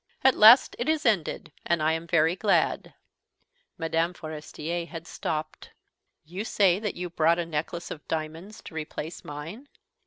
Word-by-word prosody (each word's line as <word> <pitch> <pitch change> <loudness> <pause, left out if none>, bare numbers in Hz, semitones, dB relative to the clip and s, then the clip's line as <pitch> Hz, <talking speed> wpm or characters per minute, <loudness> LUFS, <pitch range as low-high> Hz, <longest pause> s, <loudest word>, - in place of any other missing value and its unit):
At 265 - +6
last 225 +5 +7
it 240 +6 -1
is 315 -2 0
ended, 175 -7 0
and 170 - +1
I 155 +1 +2
am 160 +1 -3
very 165 +1 +3
glad." 200 +1 +1 0.8
Mme. 165 +1 0
Forestier 160 +1 -5
had 165 -2 -8
stopped. 155 -1 -5 0.6
"You 180 +6 -5
say 195 -4 +3
that 210 -2 -3
you 180 -1 -5
bought 165 0 +3
a 175 - -1
necklace 165 +2 -4
of 150 - -8
diamonds 160 +6 -5
to - - -11
replace 160 +1 -6
mine?" 165 - -8
170 Hz, 155 wpm, -27 LUFS, 155-195 Hz, 0.8 s, last